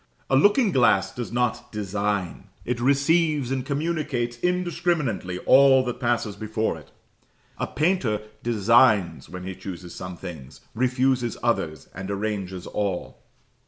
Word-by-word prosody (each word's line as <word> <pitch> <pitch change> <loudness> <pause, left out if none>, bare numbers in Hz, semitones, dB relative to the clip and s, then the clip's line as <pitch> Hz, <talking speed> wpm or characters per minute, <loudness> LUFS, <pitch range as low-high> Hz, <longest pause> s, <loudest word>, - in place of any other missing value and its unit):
A - - +5
looking 205 - +4
glass 120 - +3
does 120 -2 -5
not 120 0 -1
design 100 -3 -2 0.2
it 120 0 -2
receives 140 +1 +2
and 130 -1 -1
communicates 140 -5 -2
indiscriminately 170 - -1
all 135 -1 +6
that 125 -1 -4
passes 120 -4 0
before 110 0 -2
it; - - -13 0.7
a - - -1
painter 150 - +1 0.2
designs 105 - +3
when 90 +1 -7
he 95 +1 -5
chooses 90 -2 -8
some 90 -1 -7
things, 75 -8 -9
refuses 130 0 +1
others, 95 - -1
and 95 +2 -6
arranges 100 -3 -3
all. 100 -4 -3
120 Hz, 125 wpm, -24 LUFS, 95-135 Hz, 0.7 s, all